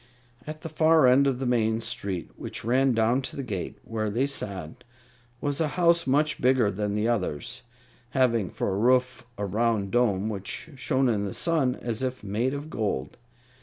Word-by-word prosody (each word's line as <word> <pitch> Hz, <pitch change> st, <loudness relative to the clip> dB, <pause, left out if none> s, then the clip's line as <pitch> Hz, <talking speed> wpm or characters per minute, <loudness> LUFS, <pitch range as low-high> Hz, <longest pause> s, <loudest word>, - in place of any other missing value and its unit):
At 155 Hz, 0 st, -6 dB
the 165 Hz, -, -6 dB
far 160 Hz, -1 st, +4 dB
end 130 Hz, +3 st, +5 dB
of 135 Hz, -2 st, +1 dB
the 135 Hz, -, -3 dB
main 110 Hz, -2 st, +1 dB
street, 95 Hz, -6 st, -3 dB
which -, -, -7 dB
ran 130 Hz, +2 st, +3 dB
down 115 Hz, +3 st, +2 dB
to 130 Hz, -, -7 dB
the 140 Hz, -, -4 dB
gate 100 Hz, -8 st, -4 dB
where 110 Hz, -1 st, -2 dB
they 120 Hz, +6 st, +1 dB
sat, 100 Hz, -, -5 dB, 0.6 s
was 145 Hz, +2 st, -1 dB
a 160 Hz, -, +2 dB
house 170 Hz, -3 st, +4 dB
much 150 Hz, +3 st, +2 dB
bigger 125 Hz, -4 st, +3 dB
than 105 Hz, +1 st, -2 dB
the 105 Hz, +2 st, +1 dB
others, 110 Hz, -, -2 dB, 0.5 s
having 120 Hz, -6 st, +2 dB
for -, -, -2 dB
a 95 Hz, -, -1 dB
roof 125 Hz, +2 st, +2 dB
a 100 Hz, -, -2 dB
round 105 Hz, 0 st, 0 dB
dome 110 Hz, -5 st, +2 dB
which 105 Hz, -, -5 dB
shone 130 Hz, +1 st, +1 dB
in 105 Hz, -4 st, +1 dB
the 100 Hz, -, -5 dB
sun 150 Hz, -7 st, +1 dB
as 115 Hz, -1 st, -4 dB
if 130 Hz, -2 st, -3 dB
made 115 Hz, +7 st, -1 dB
of 145 Hz, +2 st, -6 dB
gold. 100 Hz, -, -2 dB
120 Hz, 185 wpm, -26 LUFS, 105-135 Hz, 0.6 s, end